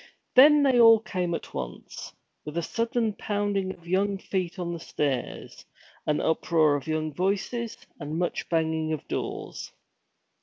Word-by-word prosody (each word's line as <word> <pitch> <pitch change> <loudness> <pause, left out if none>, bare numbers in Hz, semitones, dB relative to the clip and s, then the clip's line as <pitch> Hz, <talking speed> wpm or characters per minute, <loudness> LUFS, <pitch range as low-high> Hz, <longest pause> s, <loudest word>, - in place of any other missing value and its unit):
Then 290 +3 +8
they 260 -3 +4
all 225 -1 +8
came 180 -5 -2
at - - -8
once, - - -7 0.3
with 150 +2 -6
a 170 - 0
sudden 230 +1 -1
pounding 205 -2 -1
of 170 -2 -13
young 195 +2 +1
feet 185 -2 -3
on 175 -1 -3
the 170 - -5
stairs, 140 -6 -3 0.4
an 150 -1 +2
uproar 160 -1 +2
of 140 0 -5
young 155 -1 -1
voices, 205 - -1 0.2
and 150 +1 -4
much 175 0 -2
banging 160 -1 0
of 155 - -5
doors. - - -5
175 Hz, 150 wpm, -27 LUFS, 160-205 Hz, 0.4 s, Then